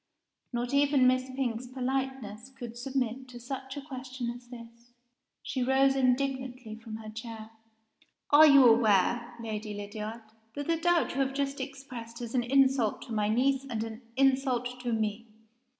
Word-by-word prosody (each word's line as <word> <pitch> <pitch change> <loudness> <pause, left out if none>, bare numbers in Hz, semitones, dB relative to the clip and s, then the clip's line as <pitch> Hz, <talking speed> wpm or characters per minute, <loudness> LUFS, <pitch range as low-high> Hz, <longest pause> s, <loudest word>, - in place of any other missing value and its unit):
Not 240 +1 -2
even 280 -2 +4
Miss 255 0 +3
Pink's 255 -2 -2
politeness 255 -3 -3
could 245 -3 -9
submit 260 0 -2
to 245 -1 -10
such 265 +2 -6
a 285 - -5
question 255 -3 -5
as 245 0 -11
this. 235 0 -13 0.5
She 260 - -3
rose 270 +1 +3
indignantly 260 -2 0
from 225 0 -8
her 220 0 -8
chair. 225 0 -8 0.8
"As 310 +1 +9
you 280 -2 +8
aware, 235 +1 +3
Lady 215 -2 -5
Lydiard, 210 +2 -6 0.3
that 285 - -4
the 330 +1 +1
doubt 345 0 +2
you - - -6
have 270 0 -1
just 280 0 -1
expressed 260 -4 -8
is 235 -2 -6
an 255 - +2
insult 260 -2 +2
to 235 - -7
my 210 -1 +1
niece, 265 +4 +2
and 225 -3 -2
a 225 0 -7 0.2
insult 260 -2 +2
to 245 -1 -3
Me?" 220 0 -2
250 Hz, 160 wpm, -29 LUFS, 230-270 Hz, 0.8 s, As